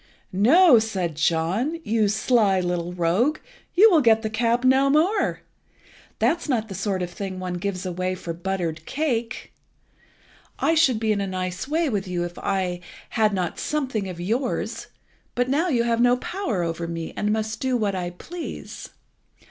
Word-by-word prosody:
"No," 255 - +6
said 190 -7 -2
John, 170 - 0
"you 220 -1 +1
sly 210 -2 +2
little 175 -1 -2
rogue, 180 - +1 0.4
you 425 +4 +7
will 325 -4 +5
get 225 -3 +4
the 220 - -2
cap 235 +2 +1
no 265 +1 +4
more. 350 +9 +2 0.8
That's 300 +9 0
not 225 -4 0
the - - -5
sort 190 0 -2
of 175 - -5
thing 190 0 -5
one 185 -1 -4
gives 190 -2 -3
away 185 +1 -2
for 170 -2 -6
buttered 170 -3 -3
cake. 255 -5 -2 1.0
I 325 - +2
should 280 -8 +3
be 220 -1 +1
in 205 -1 0
a 200 - -2
nice 185 +2 -4
way 320 +3 +1
with 205 -7 -2
you 175 -1 -2
if 175 0 -8
I 185 -2 -1 0.3
had 215 -1 +2
not 185 -4 -2
something 260 -10 -2
of 175 -2 -7
yours, 230 +9 -2 0.5
but 245 +1 0
now 305 +7 +2
you 245 -8 +2
have 235 0 +1
no 245 0 +4
power 250 - -2
over 165 0 -3
me, 165 -1 -5
but - - -3
must 215 0 -1
do 260 -1 0
what 210 -3 0
I 180 -2 -3
please. 330 - -8
215 Hz, 170 wpm, -24 LUFS, 180-255 Hz, 1.0 s, you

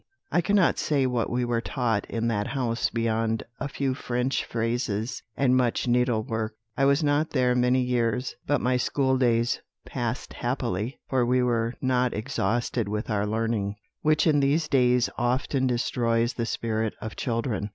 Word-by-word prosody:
"I 175 - +3
cannot 200 0 +3
say 140 -3 +1
what 125 -3 0
we 125 0 0
were 120 -1 0
taught 115 -5 -1
in 115 0 -1
that 105 -3 0
house 120 -4 -1
beyond 115 -1 0 0.2
a 140 - -2
few 140 -1 -1
French 125 0 -1
phrases 115 -1 -2 0.2
and 130 -2 +3
much 125 -1 +1
needlework. 115 -3 0 0.2
I 135 - +2
was 140 +3 +3
not 150 +2 +2
there 125 -3 +2
many 125 +1 +3
years, 125 0 0
but 145 - +2
my 125 0 +2
school 130 +1 +1
days 120 -2 +2 0.2
passed - - -4
happily, 105 +8 -2
for 130 -2 +2
we 125 +1 +2
were 115 -1 0
not 125 -1 +1
exhausted 120 -1 -1
with 105 +2 -3
our 105 -1 0
learning, 110 -2 -1 0.3
which 155 0 +3
in 150 -3 +4
these 145 +3 +2
days 125 -3 +3
often 130 +2 +1
destroys 120 -1 +1
the 115 -1 -2
spirit 110 -2 -1
of 110 - -6
children. 115 -4 -2
125 Hz, 160 wpm, -26 LUFS, 115-130 Hz, 0.3 s, in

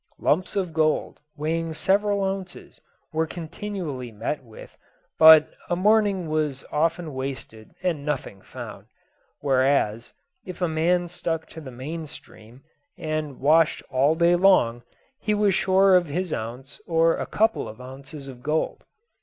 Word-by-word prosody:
Lumps 180 +5 0
of 185 -5 -1
gold, 155 -1 0 0.2
weighing 160 +2 -2
several 200 +3 +1
ounces, 190 -1 -5 0.3
were 160 +1 0
continually 165 - -6
met 135 +7 -4
with, 110 -3 -13 0.4
but 160 -1 +9 0.2
a 175 - +1
morning 200 -2 +2
was 155 -3 -2
often 165 0 0
wasted 130 -5 -7
and 165 -6 -1
nothing 140 -9 -4
found; - - -10 0.5
whereas, 130 -5 +1 0.3
if 185 - -9
a 180 - +1
man 170 +3 +1
stuck 165 -2 -3
to 160 - -10
the 140 - -9
main 150 +6 -6
stream, 120 -1 -14 0.3
and 155 -3 -4
washed 155 +3 +3
all 135 +4 +3
day 170 +1 +4
long, 175 -11 +4 0.4
he 210 0 0
was 205 -2 +2
sure 190 +1 +4
of 180 -2 +3
his 175 +3 -3
ounce 120 +5 -6
or 165 0 +2
couple 220 - +1
of 110 - -11
ounces 135 +2 -10
of 125 -2 -10
gold. 155 +4 -2
160 Hz, 140 wpm, -24 LUFS, 135-180 Hz, 0.5 s, but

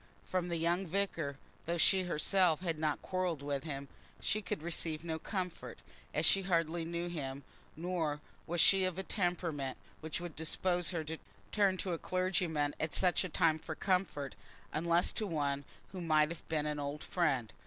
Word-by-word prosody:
From 185 -1 -1
the 170 - 0
young 170 +3 +1
vicar, 165 -6 -1 0.3
though 170 +1 +1
she 185 +2 +5
herself 175 0 +3
had 165 -4 -1
not 155 -1 0
quarrelled 180 -6 -1
with 140 0 -2
him, 140 -3 -4 0.3
she 215 - 0
could 170 -5 -3
receive 165 -1 -2
no 160 -1 -2
comfort, 180 -1 -4 0.3
as - - +1
she 195 - +6
hardly 170 -2 +1
knew 170 +1 -2
him; 140 -5 -4 0.3
nor 165 -3 -1 0.3
was 170 +1 -1
she 195 +3 +6
of 185 -1 0
a 190 - -1
temperament 170 -9 -1 0.2
which 160 -1 -4
would 175 -2 -6
dispose 175 +2 +1
her 170 -3 -1
to 160 +1 -5 0.3
turn 200 -3 +3
to 185 -1 -1
a 165 - -2
clergyman 175 -5 +1
at 160 - -1
such 180 0 +4
a 185 - -3
time 160 -2 +3
for 155 0 -5
comfort, 165 - 0 0.4
unless 170 +2 +2
to 215 - -1
one 145 -4 0 0.3
who 185 - -5
might 155 -2 +4
have 170 -1 -8
been 155 -2 +1
an 150 -1 -1
old 145 +1 -3
friend. 135 -10 +1
165 Hz, 180 wpm, -34 LUFS, 155-180 Hz, 0.4 s, she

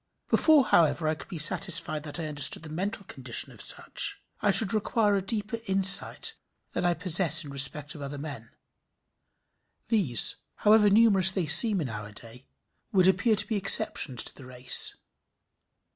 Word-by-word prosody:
Before, 310 -4 +3
however, 160 -1 0
I 155 - -1
could 150 -4 -13
be 175 - -9
satisfied 155 0 +2
that 150 +3 -6
I 165 - -5
understood 145 0 0
the 155 - -11
mental 200 +6 -6
condition 130 -7 -8
of - - -13
such, - - -3 0.2
I - - 0
should 200 +1 +5
require 215 -1 -1
a 195 - -2
deeper 210 +3 -5
insight 195 0 +4 0.4
than - - -4
I 175 -1 0
possess 170 -2 +2
in 145 - -11
respect 140 +2 0
of 150 - -13
other 140 +1 -8
men. 140 -6 -10 1.4
These, 190 - 0 0.2
however 210 0 +2
numerous 200 -3 +4
they 190 -2 -4
seem 205 +6 +4
in 140 - -6
our 105 -1 -9
day, 115 +4 -13 0.4
would 185 -2 +2
appear 190 +4 +1
to 205 0 -2
be 220 - -3
exceptions 150 -9 +1
to - - -5
the 135 - -15
race. 125 0 0
170 Hz, 165 wpm, -25 LUFS, 145-205 Hz, 1.4 s, should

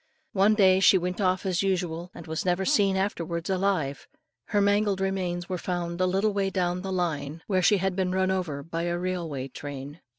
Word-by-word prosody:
One 200 +2 +4
day 190 -3 +5
she 195 0 +6
went 180 +2 -2
off 185 0 +1
as 185 -2 +1
usual, 180 -3 -1
and 170 - -9
was 160 -1 -3
never 180 +1 +1
afterwards 190 - 0
seen 190 - +2
alive: 180 -8 -1 0.4
her 205 - 0
mangled 205 -1 +2
remains 185 -2 -2
were 180 -1 -3
found 175 -1 -3
a 185 - +3
little 195 +3 +1
way 195 -1 0
down 180 -1 -1
the 195 0 -4
line, 165 -4 -2
where 185 -3 +1
she 205 +3 +4
had 190 0 -1
been 185 -1 0
run 190 0 +1
over 165 -7 -2
by 165 +2 -3
a 175 0 -1
railway 170 -7 -3
train. 145 +3 -8
185 Hz, 200 wpm, -27 LUFS, 170-195 Hz, 0.4 s, she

